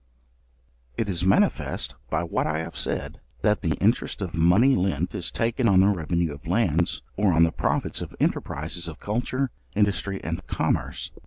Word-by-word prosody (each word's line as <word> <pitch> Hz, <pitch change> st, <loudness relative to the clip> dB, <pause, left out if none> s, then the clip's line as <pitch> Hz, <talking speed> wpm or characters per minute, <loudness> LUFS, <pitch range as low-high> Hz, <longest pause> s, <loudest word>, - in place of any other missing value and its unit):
It 115 Hz, -, 0 dB
is 90 Hz, -2 st, -1 dB
manifest 95 Hz, -, +1 dB, 0.2 s
by -, -, 0 dB
what -, -, -1 dB
I 80 Hz, -, 0 dB
have 80 Hz, -, -5 dB
said, -, -, -3 dB, 0.2 s
that 105 Hz, 0 st, +3 dB
the 80 Hz, -5 st, 0 dB
interest 110 Hz, +5 st, +1 dB
of 95 Hz, -4 st, -4 dB
money 90 Hz, +11 st, +5 dB
lent 95 Hz, -5 st, 0 dB
is -, -, -2 dB
taken 115 Hz, +1 st, +1 dB
on 95 Hz, -1 st, +6 dB
the 95 Hz, -, +5 dB
revenue 85 Hz, -3 st, 0 dB
of 70 Hz, +2 st, -12 dB
lands, 85 Hz, -4 st, +1 dB
or 100 Hz, -1 st, +3 dB
on 80 Hz, +1 st, +5 dB
the 85 Hz, -, +3 dB
profits -, -, -1 dB
of -, -, -7 dB
enterprizes 80 Hz, +3 st, -1 dB
of 80 Hz, -, -10 dB
culture, 125 Hz, +4 st, -1 dB, 0.2 s
industry, 100 Hz, -1 st, +1 dB
and -, -, -3 dB
commerce. -, -, -1 dB
95 Hz, 170 wpm, -25 LUFS, 85-105 Hz, 0.2 s, on